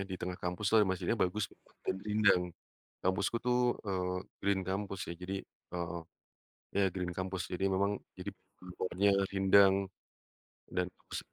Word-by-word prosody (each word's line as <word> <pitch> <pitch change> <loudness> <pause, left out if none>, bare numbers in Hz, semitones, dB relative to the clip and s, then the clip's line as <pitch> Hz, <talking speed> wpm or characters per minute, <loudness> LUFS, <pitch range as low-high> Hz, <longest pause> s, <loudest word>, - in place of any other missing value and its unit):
di 95 - -3
tengah 90 0 -4
kampuslah 100 +5 +3
masjidnya 95 0 0
bagus 100 +2 -2
gitu - - -25 0.2
dan 95 - 0
rindang. 105 -3 +4 0.6
Kampusku, 95 +4 +2
tuh, 125 0 +3 0.3
eee, 90 -2 -1 0.2
Green 100 0 +2
kampus, 95 0 -2
ya, - - -2
jadi, 95 +2 -3
eee, 85 -1 -6 0.8
ya, 100 - +5
Green 90 -2 -2
kampus 95 +1 -2
jadi 95 +1 -1
memang 100 +1 +2 0.2
jadi 90 +2 -4 0.3
pohon-pohonnya 90 +2 0 0.2
rindang, 95 0 +7 1.0
dan 90 - +1
bagus - - -7
95 Hz, 140 wpm, -33 LUFS, 90-100 Hz, 1.0 s, rindang